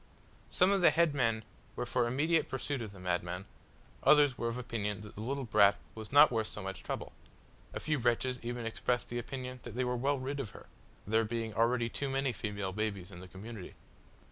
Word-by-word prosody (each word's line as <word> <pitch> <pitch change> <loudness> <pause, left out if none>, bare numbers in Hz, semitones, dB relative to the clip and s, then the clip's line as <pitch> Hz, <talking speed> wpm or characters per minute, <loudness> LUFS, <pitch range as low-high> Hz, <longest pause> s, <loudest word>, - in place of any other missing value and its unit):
Some 185 +1 +4
of 195 -2 +3
the 175 - +8
head 170 -3 +3
men 115 -5 +1 0.3
were - - -2
for 120 - +1
immediate 155 +7 +2
pursuit 135 0 -2
of 110 -3 -5
the 100 - -13
madman; 90 +1 -2 0.6
others 145 -3 +6
were 115 - -2
of 115 +1 -2
opinion 105 -4 -3
that 105 -1 -10
the 105 - -8
little 135 +4 -2
brat 100 -4 +5 0.2
was 110 -1 -8
not 145 +1 +8
worth 110 -2 0
so 105 - -7
much 95 0 -5
trouble; - - -4 0.6
a - - -4
few 155 -2 0
wretches 125 +1 +1
even 120 0 -4
expressed 120 +2 -1
the 120 - -2
opinion 130 +1 -6
that 120 -2 -8
they 130 - +1
were 125 0 0
well 140 +4 +1
rid 135 +2 -3
of 125 -6 -3
her - - -13 0.4
there 110 +2 +3
being 115 0 -3
already 115 +2 +2
too 140 +4 -3
many 135 -1 0
female 100 -2 -3
babies 100 -3 -2
in 90 - -10
the 95 - -9
community! 100 +1 -9
120 Hz, 210 wpm, -33 LUFS, 105-135 Hz, 0.6 s, the